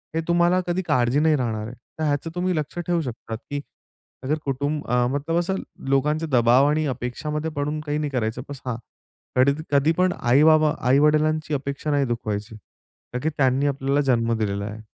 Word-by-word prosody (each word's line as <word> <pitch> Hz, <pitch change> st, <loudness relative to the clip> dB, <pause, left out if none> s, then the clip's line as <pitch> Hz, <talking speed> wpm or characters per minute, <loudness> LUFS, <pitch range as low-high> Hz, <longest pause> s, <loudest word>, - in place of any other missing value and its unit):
हे 165 Hz, -, +1 dB
तुम्हाला 175 Hz, +1 st, +3 dB
कधी 175 Hz, +2 st, 0 dB
काळजी 125 Hz, +2 st, +2 dB
नाही 155 Hz, 0 st, +4 dB
राहणार 115 Hz, -5 st, -2 dB
आहे. 120 Hz, -, -8 dB, 0.3 s
तर -, -, -1 dB
ह्याचं 145 Hz, +1 st, 0 dB
तुम्ही 180 Hz, 0 st, 0 dB
लक्ष 155 Hz, +1 st, -3 dB
ठेवू 175 Hz, 0 st, 0 dB
शकता 120 Hz, -4 st, -6 dB
की 140 Hz, +5 st, -6 dB, 0.6 s
अगर 150 Hz, +4 st, 0 dB
कुटुंब 145 Hz, +2 st, -2 dB
अं, 125 Hz, 0 st, +2 dB
मतलब 150 Hz, +4 st, -1 dB
असं 185 Hz, +2 st, -1 dB, 0.3 s
लोकांचे 150 Hz, +4 st, +1 dB
दबाव 125 Hz, +2 st, +5 dB
आणि 155 Hz, +1 st, +1 dB
अपेक्षामध्ये 150 Hz, +5 st, -3 dB
पडून 150 Hz, +1 st, -2 dB
काही 145 Hz, 0 st, -1 dB
नाही 150 Hz, -1 st, -1 dB
करायचं 120 Hz, -1 st, -2 dB
बस 140 Hz, -2 st, -8 dB
हां. 125 Hz, -2 st, -2 dB, 0.6 s
कधी 135 Hz, +2 st, +5 dB, 0.2 s
कधीपण 160 Hz, +6 st, +3 dB
आई-बाबा 150 Hz, +4 st, +5 dB, 0.2 s
आई-वडिलांची 155 Hz, +3 st, +3 dB
अपेक्षा 140 Hz, +2 st, -2 dB
नाही 140 Hz, -1 st, +2 dB
दुखवायची. 110 Hz, -3 st, -3 dB, 0.6 s
का 125 Hz, -, -1 dB
की 160 Hz, -, +2 dB
त्यांनी 135 Hz, +1 st, +2 dB
आपल्याला 140 Hz, +1 st, +1 dB
जन्म 115 Hz, -1 st, +1 dB
दिलेला 100 Hz, -2 st, -2 dB
आहे. 110 Hz, +1 st, -7 dB
145 Hz, 175 wpm, -23 LUFS, 125-155 Hz, 0.6 s, दबाव